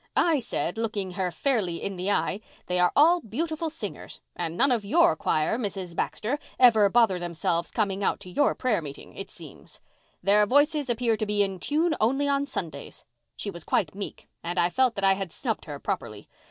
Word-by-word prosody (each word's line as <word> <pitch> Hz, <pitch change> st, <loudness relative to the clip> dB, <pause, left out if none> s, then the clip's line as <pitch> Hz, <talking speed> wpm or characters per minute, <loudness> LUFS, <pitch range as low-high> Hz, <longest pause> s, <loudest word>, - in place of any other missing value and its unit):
I 325 Hz, -4 st, +4 dB
said, 200 Hz, -, -3 dB
looking 210 Hz, -4 st, -2 dB
her 185 Hz, 0 st, -1 dB
fairly 205 Hz, -5 st, 0 dB
in 195 Hz, -, -3 dB
the 185 Hz, +2 st, -2 dB
eye, 205 Hz, 0 st, 0 dB, 0.2 s
'They 180 Hz, 0 st, -1 dB
are 180 Hz, 0 st, +4 dB
all 335 Hz, +5 st, +6 dB
beautiful 315 Hz, +7 st, -3 dB
singers, 325 Hz, +2 st, -7 dB, 0.2 s
and 170 Hz, -1 st, -4 dB
none 270 Hz, +2 st, +4 dB
of 235 Hz, -4 st, +1 dB
your 340 Hz, +11 st, +4 dB
choir, 155 Hz, +10 st, 0 dB
Mrs. 195 Hz, -6 st, -4 dB
Baxter, 250 Hz, +12 st, -2 dB, 0.2 s
ever 220 Hz, -5 st, +6 dB
bother 220 Hz, -5 st, +3 dB
themselves 170 Hz, 0 st, -1 dB
coming 200 Hz, -2 st, -1 dB
out -, -, +1 dB
to 185 Hz, -, -10 dB
your 290 Hz, -, +2 dB
prayer 235 Hz, -8 st, 0 dB
meeting, 145 Hz, -2 st, -10 dB
it -, -, -7 dB
seems. -, -, -12 dB, 0.4 s
Their 205 Hz, +2 st, +4 dB
voices 290 Hz, +2 st, +3 dB
appear 235 Hz, -1 st, +1 dB
to 215 Hz, -, -1 dB
be 205 Hz, 0 st, +2 dB
in 195 Hz, -2 st, -3 dB
tune 315 Hz, -, +1 dB
only 270 Hz, +6 st, +2 dB
on 280 Hz, 0 st, +1 dB
Sundays!' 160 Hz, -, -6 dB, 0.3 s
She 200 Hz, -, -5 dB
was 170 Hz, -3 st, -10 dB
quite 165 Hz, -7 st, 0 dB
meek 200 Hz, +1 st, -7 dB
and 175 Hz, +2 st, -4 dB
I 175 Hz, 0 st, +3 dB
felt 255 Hz, 0 st, +2 dB
that 200 Hz, -, -4 dB
I 195 Hz, 0 st, +5 dB
had 190 Hz, -3 st, -4 dB
snubbed -, -, -3 dB
her -, -, -6 dB
properly. -, -, -5 dB
210 Hz, 195 wpm, -26 LUFS, 180-260 Hz, 0.4 s, all